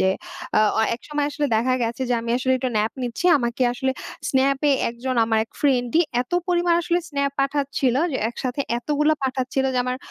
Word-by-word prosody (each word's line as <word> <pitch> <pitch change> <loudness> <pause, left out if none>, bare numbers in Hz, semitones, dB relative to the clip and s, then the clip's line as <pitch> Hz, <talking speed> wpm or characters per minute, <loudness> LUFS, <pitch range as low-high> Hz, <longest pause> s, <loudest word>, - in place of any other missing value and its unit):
যে, - - +3 0.5
আ - - +5 0.2
অ - - +4
একসময় 295 +4 -3
আসলে 290 0 -1
দেখা 245 +4 +1
গেছে 235 +3 -2
যে, - - +3
আমি 230 0 -4
আসলে 260 0 +1
একটু 255 - -1
ন্যাপ 215 +1 +1
নিচ্ছি। 245 +7 -4
আমাকে 235 0 -1
আসলে 265 +2 -1 0.4
স্ন্যাপে 275 +2 +2 0.2
একজন, 250 +2 -4
আমার 225 0 +1
এক 225 - -33
ফ্রেন্ডই 260 +1 +2 0.2
এত 250 - -26 0.2
পরিমাণ 350 -1 +2
আসলে 345 0 +1
স্ন্যাপ 280 -2 -1
পাঠাচ্ছিল। 275 -2 0 0.2
যে - - 0
একসাথে 250 +3 -4 0.2
এতগুলো 300 +4 +1
পাঠাচ্ছিলো 265 0 0
যে, - - +1
আমার 250 0 -2
260 Hz, 185 wpm, -23 LUFS, 240-285 Hz, 0.5 s, আ